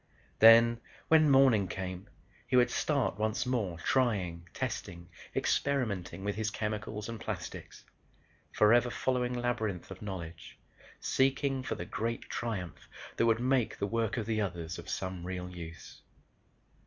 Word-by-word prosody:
Then 115 +1 +8 0.3
when 155 -2 +6
morning 130 -8 +5
came 90 0 -6 0.4
he - - 0
would 125 -1 +5
start 140 -9 0
once 110 +2 0
more 110 -9 -1
trying, 90 -6 0
testing, 85 +2 -5 0.3
experimenting 100 -10 0
with 100 0 -1
his 110 0 -1
chemicals 105 -1 -4
and 115 -1 -6
plastics, - - -7 0.7
forever 120 +3 +4
following 125 0 0
labyrinth 120 -7 -2
of 95 - -9
knowledge, 85 -5 -7 0.4
seeking 135 0 +1
for 130 - -3
the - - -5
great 115 +1 -3
triumph 100 -9 -4 0.3
that 115 - +3
would 115 0 +3
make 125 -1 +1
the - - -1
work 115 +2 -1
of 115 - -1
the 110 -1 0
others 85 -4 -4
of 85 - -9
some 95 -2 -4
real 90 0 -4
use. 85 -2 -10
110 Hz, 140 wpm, -31 LUFS, 95-120 Hz, 0.7 s, Then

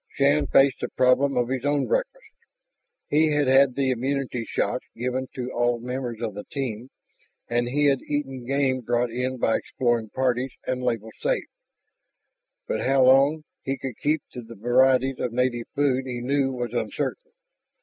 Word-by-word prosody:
Shann 145 +1 +3
faced 135 -2 +4
the - - -2
problem 130 +1 +2
of 120 0 +1
his 130 -1 -2
own 145 0 +1
breakfast. - - -2 0.8
He 155 +2 +3
had 150 -1 +2
had 135 -1 +5
the 135 -2 +1
immunity 130 -1 -2
shots - - -1
given 125 +2 -2
to 125 0 -4
all 120 0 +1
members 125 -1 -4
of 110 -3 -2
the 105 - -7
team, 125 -3 -5 0.6
and 120 0 0
he 145 +4 +1
had 140 -2 +3
eaten 135 -4 -3
game 135 -1 +1
brought 120 0 0
in 125 +2 -2
by 115 -2 +2
exploring 120 -4 -1
parties 130 +1 -1
and 125 0 -2
labeled 115 -3 -2
"safe." - - 0 1.2
But - - -1
how 135 0 +3
long 140 +4 +5 0.2
he 135 0 -3
could 130 -3 -6
keep 150 +5 0
to 125 - -7
the 115 0 -12
varieties 130 +4 +3
of 120 - -2
native 120 -1 0
food 135 -2 +1
he 125 -1 -4
knew 135 +2 0
was 120 -2 -4
uncertain. 475 - -3
130 Hz, 170 wpm, -25 LUFS, 120-140 Hz, 1.2 s, had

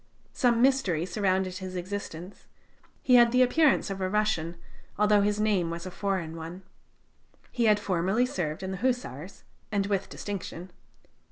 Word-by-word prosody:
Some 240 -1 +2
mystery 230 - +2
surrounded 185 -1 0
his 185 -1 -7
existence; 185 -1 -6 0.6
he 255 - +3
had 240 -1 +6
the 250 +1 +5
appearance 275 -3 +3
of 195 0 -5
a 185 - 0
Russian, 190 -5 0 0.4
although 210 0 +4
his 205 +1 +1
name 200 -6 +1
was 170 +1 -5
a 185 - -6
foreign 185 -5 -2
one. 165 +3 -8 0.9
He 240 -2 0
had 210 -1 +4
formerly 195 +5 +1
served 175 -8 -3
in 190 - -3
the 190 - -4
Hussars, 200 - -3 0.3
and 200 -2 +1
with 200 -1 -1
distinction. 185 -3 -6
195 Hz, 155 wpm, -28 LUFS, 180-215 Hz, 0.9 s, had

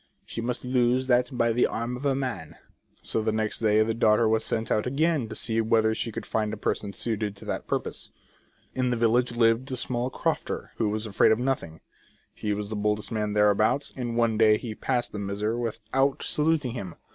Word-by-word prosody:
She 115 - -5
must 125 +2 -3
lose 125 0 +2
that 125 -1 +3
by 115 -2 +1
the 120 - +3
arm 115 +2 -3
of 135 +3 -2
a 135 - +2
man." 125 - -4 0.5
So 110 - -1
the 110 0 0
next 110 0 -1
day 110 -1 +4
the 110 +1 -1
daughter 110 0 +3
was 110 0 +2
sent 110 0 -1
out 105 +3 +1
again 145 -2 +1
to 110 - -6
see 115 -1 0
whether 110 0 +3
she 115 - -3
could - - -6
find 105 -1 -1
a 110 - -5
person 100 0 -2
suited 105 0 -2
to - - -11
that - - -4
purpose. - - -3 0.6
In 130 -1 0
the 120 - 0
village 120 +2 +2
lived 115 +3 +2
a - - -1
small 125 0 -1
crofter, - - -3
who 110 - +1
was 110 +1 -2
afraid 105 -2 +3
of 110 - +4
nothing; 120 -11 -2 0.5
he 105 - -3
was 105 +1 -3
the - - -2
boldest 105 0 -1
man 105 -2 -1
thereabouts; 105 +6 +2
and 120 -3 -3
one 115 -2 +2
day 110 -1 +6
he 115 -1 -6
passed 120 +2 -1
the 105 - -5
miser 100 +3 -2
without 120 +4 -1
saluting 150 -4 +1
him. 100 -8 -6
115 Hz, 210 wpm, -26 LUFS, 105-125 Hz, 0.6 s, day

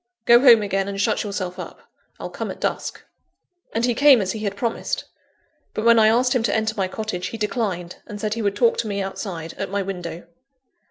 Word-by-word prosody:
"Go 235 0 +7
home 240 -4 +7
again, 195 -1 -1
and 200 0 -4
shut 210 +2 +1
yourself 185 -3 -4
up; - - -8 0.4
I'll - - -6
come - - -5
at - - -7
dusk." - - -3 0.7
And 230 +2 0
he 245 - +1
came 275 +1 +6
as 190 -2 -1
he 220 - -5
had 200 -2 -3
promised. 230 +2 -2 0.7
But 215 - -2
when 235 -1 +6
I 215 - +6
asked 245 +3 +3
him 250 - +2
to 230 - 0
enter 220 0 0
my 195 -2 0
cottage, 185 -2 -4
he 225 - -6
declined, 205 -5 -2
and 205 - -7
said 215 0 -1
he 230 - -3
would 200 -1 0
talk 235 0 +3
to 225 - -1
me 200 -1 -2
outside, 190 -4 -5
at - - -3
my 200 0 -1
window. 180 -3 -6
210 Hz, 220 wpm, -22 LUFS, 195-230 Hz, 0.7 s, Go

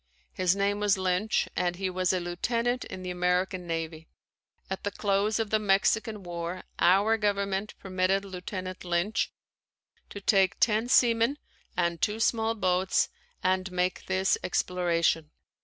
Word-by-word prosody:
His 185 0 +2
name 200 +1 0
was 205 -2 +3
Lynch 185 +3 +1
and 175 -1 0
he 190 +1 -2
was 185 0 0
a 185 - 0
lieutenant 230 +8 -1
in 185 - -8
the 180 - -3
American 180 0 0
Navy. 165 -1 -4 0.6
At 190 - -5
the 205 - 0
close 205 +1 0
of 225 -2 -2
the 215 - +3
Mexican 210 +1 +1
War, 175 +1 -5 0.2
our 200 +5 +4
Government 200 -1 -1
permitted 190 +1 0
Lieutenant 185 0 -6
Lynch 175 +5 0 0.8
to 200 - -7
take 195 -2 +2
ten 225 +1 +2
seamen 235 +2 +4 0.4
and 170 -2 0
two 210 +1 0
small 225 0 +1
boats 185 -2 +1 0.3
and 185 0 +1
make 180 0 -1
this 190 0 +1
exploration. 170 -3 +1
190 Hz, 140 wpm, -28 LUFS, 180-210 Hz, 0.8 s, our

